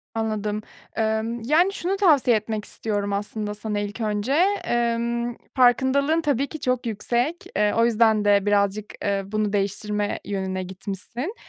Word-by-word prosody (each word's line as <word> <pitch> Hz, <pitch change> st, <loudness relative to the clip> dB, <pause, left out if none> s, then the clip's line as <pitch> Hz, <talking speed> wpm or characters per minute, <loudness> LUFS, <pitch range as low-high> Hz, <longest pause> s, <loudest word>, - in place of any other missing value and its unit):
Anladım. 215 Hz, -1 st, -2 dB, 0.3 s
Emm, 220 Hz, +1 st, -1 dB
yani, 345 Hz, +8 st, +3 dB
şunu 380 Hz, +1 st, -1 dB
tavsiye 285 Hz, -, +4 dB
etmek 215 Hz, 0 st, -4 dB
istiyorum 205 Hz, -2 st, -2 dB
aslında 210 Hz, +1 st, -3 dB
sana 210 Hz, 0 st, -3 dB
ilk 205 Hz, +3 st, -4 dB
önce, 210 Hz, +4 st, -1 dB, 0.3 s
emm, 235 Hz, 0 st, 0 dB, 0.2 s
farkındalığın 270 Hz, +5 st, +3 dB
tabii 280 Hz, -2 st, +1 dB
ki 310 Hz, +2 st, -8 dB
çok 250 Hz, -1 st, -1 dB
yüksek. 240 Hz, +8 st, -1 dB
Eee, 210 Hz, 0 st, +2 dB
o 230 Hz, -, +5 dB
yüzden 220 Hz, -2 st, +3 dB
de 200 Hz, -1 st, +4 dB
birazcık, 205 Hz, 0 st, +1 dB, 0.2 s
eee, 200 Hz, -1 st, 0 dB
bunu 210 Hz, +1 st, -1 dB
değiştirme 205 Hz, +1 st, -1 dB
yönüne 190 Hz, -2 st, -2 dB
gitmişsin. 200 Hz, -, -6 dB
220 Hz, 140 wpm, -24 LUFS, 205-245 Hz, 0.3 s, o